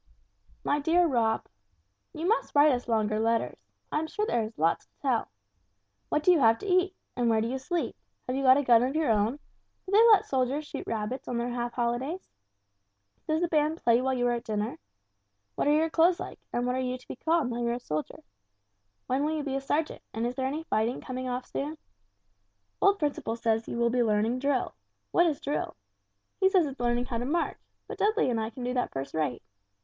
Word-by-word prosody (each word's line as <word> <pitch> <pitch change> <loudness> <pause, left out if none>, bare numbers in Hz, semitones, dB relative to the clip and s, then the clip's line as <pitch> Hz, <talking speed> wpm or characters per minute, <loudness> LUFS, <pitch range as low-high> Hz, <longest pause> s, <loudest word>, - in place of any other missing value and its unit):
"MY 290 - +1
DEAR 335 +4 +3
ROB: 230 -6 +1 0.7
"You 325 +3 -4
must 445 -5 0
write 290 +1 +7
us 250 -2 -2
longer 215 -2 +1
letters. 230 +1 0 0.3
I - - +1
am 315 - -2
quite - - -9
sure 425 +5 -1
there 240 - +1
is 220 +1 -6
lots 165 +2 +1
to - - -48
tell. 255 -5 0 0.8
What 300 - 0
do 365 - +6
you 345 - +4
have 225 -3 +5
to - - -9
eat? 370 0 +2 0.2
And 245 -1 +1
where 225 -1 +3
do 225 - 0
you 260 +2 -3
sleep? 340 +6 -2 0.3
Have 255 - -2
you 270 - -1
got 260 0 +6
a 285 - +1
gun 235 -3 +6
of 260 +4 -1
your 310 -6 +2
own? 215 +2 +2 0.5
Do 380 - -7
they 415 +2 +6
let 430 -4 +6
soldiers 265 +3 0
shoot - - -7
rabbits 225 +4 -3
on 245 - -2
their 240 +1 -2
half 240 0 -3
holidays? 250 +9 -2 1.0
Does 315 +1 +1
the 350 - +2
band 310 0 +1
play 235 -5 +3
while 265 0 0
you 245 -1 0
are 245 - +3
at 235 - -3
dinner? 210 -5 -3 0.7
What - - -1
are - - +5
your 315 +2 +2
clothes 340 +2 +4
like, - - -7
and 245 - -1
what 250 0 0
are - - -1
you 255 0 -2
to 255 - -21
be - - -6
called, 320 -5 +1
now 235 - -3
you're 235 0 0
a 240 - -3
soldier? 155 -10 -5 0.8
When 265 +3 0
will 310 +1 0
you 300 - -2
be 275 -2 -2
a 275 - -1
sergeant, 300 +3 -1
and 225 +1 -1
is 240 - -1
there 260 0 -1
any 300 +4 -3
fighting 230 -4 0
coming 255 0 -5
off 250 0 -3
soon? 300 +3 -4 1.0
Old 400 0 +5
Principle 290 - -2
says 225 -1 0
you - - -4
will 235 0 +2
be 250 0 +2
learning 225 +2 +1
drill. 275 -1 0 0.4
What 345 - +4
is 305 -4 -1
drill? 285 - -3 0.6
He 380 -1 +5
says 375 -4 +4
it's 275 -2 -6
learning 240 0 +1
how 235 -2 -3
to 240 - -3
march, 335 +6 -1 0.3
but - - -8
Dudley 430 - +2
and 230 - 0
I 220 - -2
can 245 +2 -8
do 250 +1 -1
that 250 - -1
first 135 0 -5
rate. 150 -6 -2
255 Hz, 225 wpm, -28 LUFS, 235-305 Hz, 1.0 s, write